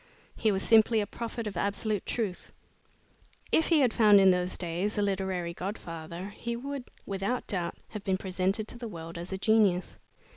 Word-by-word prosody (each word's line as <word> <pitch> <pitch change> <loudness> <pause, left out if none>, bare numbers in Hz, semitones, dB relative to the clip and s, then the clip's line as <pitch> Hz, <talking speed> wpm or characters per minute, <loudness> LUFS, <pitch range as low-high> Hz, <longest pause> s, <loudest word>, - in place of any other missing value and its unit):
He 220 - +2
was 195 -1 -1
simply 225 0 +5
a 210 - 0
prophet 230 +1 -5
of 205 -2 -4
absolute 205 +3 -1
truth. 210 -6 -3 1.0
If 320 - +3
he 325 -4 +4
had 245 -4 +3
found 210 -3 +7
in 190 -1 +7
those 180 0 0
days 180 +5 -2
a - - +2
literary 190 -3 -1
godfather, 170 -1 -6
he 235 +3 -4
would, 275 +1 -5 0.2
without 200 +5 -2
doubt, 175 -4 -2
have 210 -2 -7
been 190 -1 +1
presented 190 +3 -1
to 240 - -8
the 235 - -5
world 165 -4 -7
as 175 +2 -7
a 190 - -2
genius. 200 -3 +2
200 Hz, 180 wpm, -29 LUFS, 180-220 Hz, 1.0 s, found